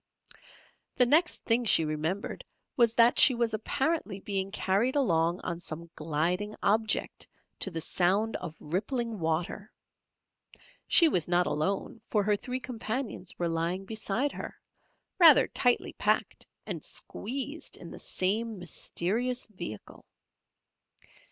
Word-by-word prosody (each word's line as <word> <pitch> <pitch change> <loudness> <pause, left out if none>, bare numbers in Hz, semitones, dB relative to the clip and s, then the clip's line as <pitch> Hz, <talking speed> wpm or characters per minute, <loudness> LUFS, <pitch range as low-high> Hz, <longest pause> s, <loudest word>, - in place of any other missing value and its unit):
The 250 - +5
next 315 +8 +2
thing 235 +1 +3
she 165 -6 +6
remembered 155 +6 -3 0.3
was 235 -2 +3
that 235 +1 +5
she 260 - +8
was 235 -2 0
apparently 265 - -1
being 195 -1 -2
carried 205 +6 0
along 170 - +1
on 170 -1 -4
some 170 0 -8
gliding 170 +7 -2
object 220 +2 0 0.3
to - - -1
the 165 -3 -4
sound 195 +7 +1
of 160 -2 -8
rippling 220 - -3
water. 170 +5 -2 1.2
She 335 - +7
was 180 - 0
not 175 0 +2
alone, 195 +8 -2
for 210 -2 +1
her 210 +1 +2
three 250 +5 -4
companions 230 -5 -5
were 175 - -1
lying 170 +3 -2
beside 220 +6 -1
her, - - -8 0.6
rather 325 -5 +8
tightly 245 -1 +1
packed - - -1 0.2
and - - -6
squeezed 275 +7 -3
in - - -11
the - - -9
same 215 +4 -1
mysterious 215 +7 -2
vehicle. 175 - -9
205 Hz, 125 wpm, -29 LUFS, 175-240 Hz, 1.2 s, she